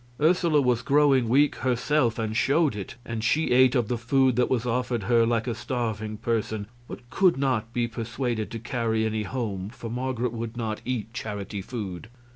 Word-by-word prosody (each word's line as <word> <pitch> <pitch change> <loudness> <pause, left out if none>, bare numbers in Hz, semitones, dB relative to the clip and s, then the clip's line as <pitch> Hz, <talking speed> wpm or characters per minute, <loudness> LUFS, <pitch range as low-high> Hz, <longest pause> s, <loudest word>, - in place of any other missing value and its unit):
Ursula 160 -1 +3
was 125 -3 +2
growing 140 -4 +3
weak 140 +4 +3
herself, 125 -1 +1
and 110 -1 -2
showed 140 +2 +2
it; 100 -2 -6
and 115 -2 -4
she 150 +4 +1
ate 130 +1 +5
of 120 -4 +2
the 120 0 -2
food 130 +1 +2
that 125 - +2
was 125 -2 0
offered 125 -2 -1
her 115 +2 +3
like 115 -1 +1
a 120 - -1
starving 110 -4 -3
person, 110 -2 -2 0.2
but 120 - -9
could 185 -5 +3
not 130 -5 0
be 120 0 0
persuaded 115 0 -3
to 115 - -5
carry 115 -2 -1
any 110 0 -1
home, 105 -4 -3
for 115 -1 -8
Marget 125 -1 -2
would 115 0 -5
not 110 -2 -3
eat 120 -3 -3
charity 105 -3 -5
food. 100 -4 -6
120 Hz, 185 wpm, -26 LUFS, 110-130 Hz, 0.2 s, ate